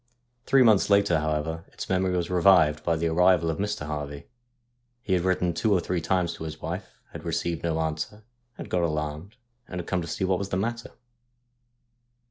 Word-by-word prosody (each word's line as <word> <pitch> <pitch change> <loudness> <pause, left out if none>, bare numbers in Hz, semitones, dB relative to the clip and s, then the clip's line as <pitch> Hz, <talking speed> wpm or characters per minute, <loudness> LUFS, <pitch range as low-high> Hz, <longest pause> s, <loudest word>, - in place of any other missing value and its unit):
Three 135 -1 +6
months 110 -5 +4
later, 100 -5 +4
however, 80 +2 -2
its - - -8
memory 95 -1 +1
was 85 0 -2
revived 90 -4 +4
by 85 - +1
the 80 +1 -2
arrival 85 0 +3
of 80 - -6
Mr. 105 -3 -2
Harvey. 75 -1 -5 0.8
He 100 - -1
had 90 - +2
written 90 -1 +1
two 110 +6 0
or 95 - +4
three 90 0 -2
times 90 0 0
to - - -8
his 80 0 -6
wife, 90 +5 -6
had - - -9
received 85 -1 -2
no 80 -1 -1
answer, 80 +7 -3 0.3
had - - -8
got 90 - 0
alarmed, 75 +4 -3 0.3
and 90 - -5
had 85 - -5
come 90 -2 0
to 85 - -6
see - - -3
what 95 -1 +1
was 100 -1 -4
the 95 - -1
matter. 115 +4 -3
90 Hz, 195 wpm, -26 LUFS, 80-95 Hz, 0.8 s, Three